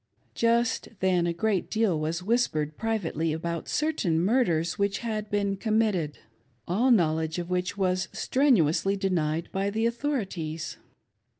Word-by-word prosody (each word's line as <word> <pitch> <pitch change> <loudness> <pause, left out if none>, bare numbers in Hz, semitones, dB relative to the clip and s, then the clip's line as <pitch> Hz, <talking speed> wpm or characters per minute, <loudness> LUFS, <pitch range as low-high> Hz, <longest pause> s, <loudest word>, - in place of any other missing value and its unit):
Just 235 0 +1
then 180 -2 +2
a - - +1
great 195 +2 0
deal 215 -8 +1
was 160 +3 -2
whispered 155 -9 0
privately 170 -8 -1
about 165 +1 -4
certain 290 - 0
murders 175 -4 +1
which 200 0 +1
had 215 -2 -3
been 200 -1 0
committed, 210 -7 0 0.5
all 220 +9 +2
knowledge 160 -7 +2
of 175 0 -4
which 180 +2 -1
was 185 -1 +1
strenuously 200 - +2
denied 170 -4 0
by 195 +1 -1
the 220 +2 -1
authorities. 200 - -2
190 Hz, 130 wpm, -27 LUFS, 165-220 Hz, 0.5 s, then